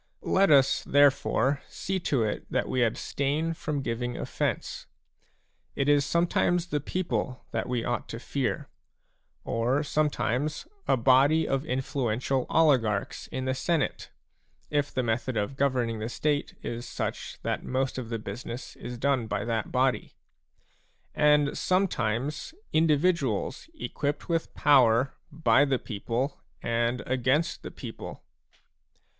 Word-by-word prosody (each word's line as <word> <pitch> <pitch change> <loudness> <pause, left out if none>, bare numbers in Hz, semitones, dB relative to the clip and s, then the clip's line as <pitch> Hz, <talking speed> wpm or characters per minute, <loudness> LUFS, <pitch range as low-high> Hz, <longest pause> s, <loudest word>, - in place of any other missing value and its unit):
Let 195 +1 +4
us, 135 -3 +5
therefore, 140 0 +3
see 190 0 -3
to 140 -8 +1
it 105 -1 -3
that - - 0
we 130 - 0
abstain 140 +7 0
from 150 -3 -3
giving 120 0 -2
offence. - - -3 0.9
It 140 - 0
is 145 -1 +5
sometimes 170 +2 +2
the 150 -4 -1
people 145 -5 -3
that - - -2
we 120 -2 -1
ought 120 - -2
to 115 - -5
fear; 130 0 -2 0.8
or 125 +6 0
sometimes 150 -1 0 0.2
a - - +4
body 135 +6 +4
of 135 +3 -1
influential 130 -1 -1
oligarchs 125 -11 +2
in 130 0 -4
the 130 - +1
Senate, 155 +2 -1 0.6
if 145 -1 +1
the 130 - -1
method 120 +1 -1
of 105 +6 -1
governing 125 -5 0
the 110 +2 -3
State 145 +4 -1
is 120 0 -4
such - - -4
that - - -2
most 130 0 -1
of 120 -3 -6
the 115 - -2
business 115 +4 -7
is 125 0 -6
done 130 -2 +1
by - - -2
that 115 -2 -2
body; 130 0 +1 1.0
and 150 -1 +4
sometimes 150 - 0 0.2
individuals 155 - +1
equipped 145 - -3
with 165 -2 -1
power 130 -3 +4 0.2
by 150 -2 +4
the 135 -2 +2
people 120 +5 -3 0.2
and 115 +1 0
against 130 +6 +1
the - - -6
people. - - -8
135 Hz, 130 wpm, -28 LUFS, 120-150 Hz, 1.0 s, us